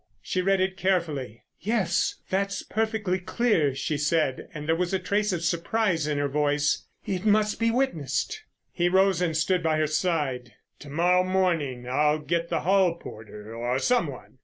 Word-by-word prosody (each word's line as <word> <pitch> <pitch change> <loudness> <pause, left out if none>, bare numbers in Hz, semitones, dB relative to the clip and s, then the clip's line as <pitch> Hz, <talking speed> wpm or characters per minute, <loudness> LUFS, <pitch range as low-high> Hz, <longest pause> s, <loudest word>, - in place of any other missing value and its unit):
She 185 - -1
read 195 +1 +2
it 190 0 0
carefully. 160 - -1 0.2
"Yes, 210 -5 0 0.2
that's 195 +1 -1
perfectly 220 -4 -1
clear," 180 - +1
she 145 +2 -2
said, 150 -3 0
and 150 -4 -7
there 165 - +3
was 180 +2 -1
a - - +3
trace 200 +3 0
of 170 -3 -2
surprise 170 0 0
in 150 -1 -1
her 145 0 +1
voice. 145 +1 0 0.2
"It 185 -2 -2
must 210 0 +2
be 230 0 +2
witnessed." 240 - -1 0.3
He 175 0 +1
rose 190 -1 +3
and 165 -3 +1
stood 180 +3 +1
by 160 -2 +1
her 155 - +2
side. 150 -6 -1 0.3
"To 145 - -11
morrow 175 +5 +3
morning. 165 -10 0
I'll 150 +4 +2
get 170 +2 -2
the - - 0
hall 190 -2 +3
porter 110 -6 -10
or 120 +2 -1
some 240 - +2
one. 130 -1 -10
170 Hz, 175 wpm, -26 LUFS, 150-190 Hz, 0.3 s, there